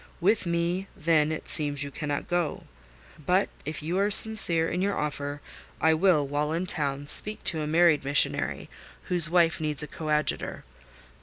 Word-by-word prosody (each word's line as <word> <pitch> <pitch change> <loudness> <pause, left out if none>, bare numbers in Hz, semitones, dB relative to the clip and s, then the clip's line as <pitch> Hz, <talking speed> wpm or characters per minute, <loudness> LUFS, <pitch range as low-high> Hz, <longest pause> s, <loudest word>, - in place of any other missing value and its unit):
With 190 +1 +1
me, 170 +3 -2
then, 155 -1 +1
it 160 - -6
seems, 145 -2 +2
you 140 - -7
cannot 145 -1 -5
go: 175 -3 -2 0.6
but 185 +6 +1 0.2
if 155 0 -6
you 175 +5 -2
are 200 +1 +1
sincere 200 -6 +5
in 180 +2 -3
your 200 +1 -1
offer, 145 -1 -4 0.4
I 160 0 +3
will, 160 -3 +2
while 150 +2 -2
in 170 +3 -2
town, 145 -5 -2
speak 210 +8 +2
to 160 -3 0
a 150 - -4
married 165 -2 +3
missionary, 140 +1 -1 0.4
whose 175 -3 +4
wife 170 -1 +1
needs 150 -2 -1
a - - -6
coadjutor. 150 0 -2
160 Hz, 165 wpm, -26 LUFS, 150-175 Hz, 0.6 s, sincere